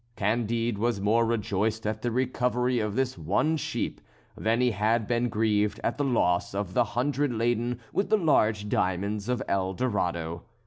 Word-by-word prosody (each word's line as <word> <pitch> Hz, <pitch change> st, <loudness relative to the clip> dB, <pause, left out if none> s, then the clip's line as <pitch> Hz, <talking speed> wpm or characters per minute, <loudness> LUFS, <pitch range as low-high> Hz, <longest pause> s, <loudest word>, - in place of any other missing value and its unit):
Candide 115 Hz, +1 st, 0 dB
was 115 Hz, -2 st, 0 dB
more 110 Hz, +3 st, +2 dB
rejoiced 110 Hz, 0 st, -1 dB
at 110 Hz, 0 st, -2 dB
the 120 Hz, -, 0 dB
recovery 125 Hz, 0 st, 0 dB
of 105 Hz, -2 st, -2 dB
this 130 Hz, -7 st, -1 dB
one 100 Hz, -, +1 dB
sheep 155 Hz, -, -3 dB, 0.3 s
than 115 Hz, +2 st, 0 dB
he 125 Hz, -1 st, +3 dB
had 110 Hz, +2 st, +1 dB
been 120 Hz, +2 st, 0 dB
grieved 105 Hz, -1 st, +1 dB
at -, -, -1 dB
the -, -, +2 dB
loss 95 Hz, -9 st, +1 dB
of 100 Hz, -2 st, -3 dB
the 120 Hz, -, +4 dB
hundred 145 Hz, +2 st, +1 dB
laden 120 Hz, +1 st, 0 dB
with 195 Hz, -, 0 dB
the 215 Hz, -, +4 dB
large 110 Hz, -, +2 dB
diamonds 100 Hz, +2 st, -1 dB
of 125 Hz, -, 0 dB
El 95 Hz, -1 st, 0 dB
Dorado. 85 Hz, -8 st, -1 dB
110 Hz, 170 wpm, -27 LUFS, 100-125 Hz, 0.3 s, the